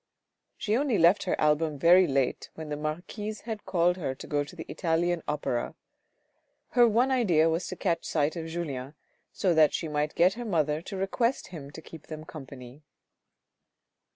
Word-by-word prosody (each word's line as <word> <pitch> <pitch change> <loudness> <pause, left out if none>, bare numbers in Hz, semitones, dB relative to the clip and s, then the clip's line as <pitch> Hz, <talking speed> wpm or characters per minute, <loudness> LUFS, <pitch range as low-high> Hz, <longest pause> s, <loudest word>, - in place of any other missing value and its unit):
She 215 0 0
only 260 -3 +1
left 175 +5 +4
her 185 - -1
album 150 0 +2
very 175 +5 +6
late 135 -3 0
when 160 -1 -7
the 150 - -2
marquise 175 +8 -5
had 225 -2 -5
her - - -32
called 175 0 +2 0.2
to - - -8
go 145 -1 0
to 145 - -12
the 160 - -7
Italian 170 0 0
Opera. 145 -5 -2 0.9
Her 245 -1 +5
one 240 +4 +2
idea 180 -11 +3
was 165 +2 -1
to 185 - -5
catch 170 -3 -1
sight 150 0 0
of 165 -1 -5
Julien, 150 -5 -5 0.4
so 185 -4 +1
that 155 -2 +4
she 165 - -3
might 150 0 -1
get 180 +3 +4
her 240 - -6
mother 155 -7 0
to 195 +3 -7
request 230 +7 -1
him 150 -6 -8
to 155 +2 -11
keep 160 -1 -12
them 155 0 -7
company. 135 -3 -10
165 Hz, 180 wpm, -28 LUFS, 150-190 Hz, 0.9 s, very